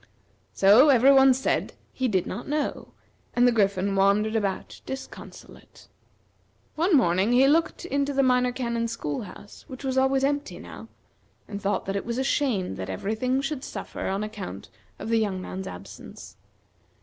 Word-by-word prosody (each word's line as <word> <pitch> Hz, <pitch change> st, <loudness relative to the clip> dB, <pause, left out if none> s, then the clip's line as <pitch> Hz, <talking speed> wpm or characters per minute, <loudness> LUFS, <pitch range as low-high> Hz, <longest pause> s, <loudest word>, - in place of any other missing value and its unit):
So 215 Hz, +9 st, +6 dB
every 265 Hz, 0 st, +6 dB
one 270 Hz, 0 st, +7 dB
said 260 Hz, +1 st, -1 dB, 0.2 s
he 260 Hz, -, -1 dB
did 190 Hz, -6 st, 0 dB
not 210 Hz, -, -6 dB
know, 295 Hz, 0 st, -2 dB, 0.5 s
and 245 Hz, 0 st, +5 dB
the -, -, +5 dB
Griffin 200 Hz, -3 st, +1 dB
wandered 200 Hz, +3 st, +2 dB
about 200 Hz, -3 st, -3 dB
disconsolate. 265 Hz, 0 st, -10 dB, 0.8 s
One 335 Hz, +1 st, +3 dB
morning 190 Hz, 0 st, +2 dB
he 260 Hz, +2 st, +5 dB
looked 325 Hz, +4 st, +1 dB
into 280 Hz, -4 st, -1 dB
the 275 Hz, 0 st, +2 dB
Minor 250 Hz, -1 st, +3 dB
Canon's 235 Hz, -2 st, -2 dB
school 145 Hz, -1 st, -4 dB
house, 205 Hz, 0 st, -12 dB
which 260 Hz, 0 st, -10 dB
was 265 Hz, -1 st, 0 dB
always 265 Hz, 0 st, +2 dB
empty 285 Hz, +1 st, -1 dB
now, -, -, -11 dB, 0.6 s
and 205 Hz, -1 st, -6 dB
thought 200 Hz, +1 st, -1 dB
that 195 Hz, -, -3 dB
it 200 Hz, -, -2 dB
was 235 Hz, +1 st, -4 dB
a 265 Hz, -, 0 dB
shame 225 Hz, -, 0 dB
that 95 Hz, 0 st, -5 dB
every 195 Hz, -, -3 dB
thing 255 Hz, +4 st, 0 dB
should 275 Hz, -1 st, -4 dB
suffer -, -, -6 dB
on 195 Hz, +2 st, -1 dB
account 200 Hz, -, -7 dB, 0.3 s
of -, -, -7 dB
the 230 Hz, 0 st, +3 dB
young 200 Hz, -4 st, -1 dB
man's 185 Hz, +1 st, -6 dB
absence. -, -, -11 dB
235 Hz, 170 wpm, -25 LUFS, 200-265 Hz, 0.8 s, one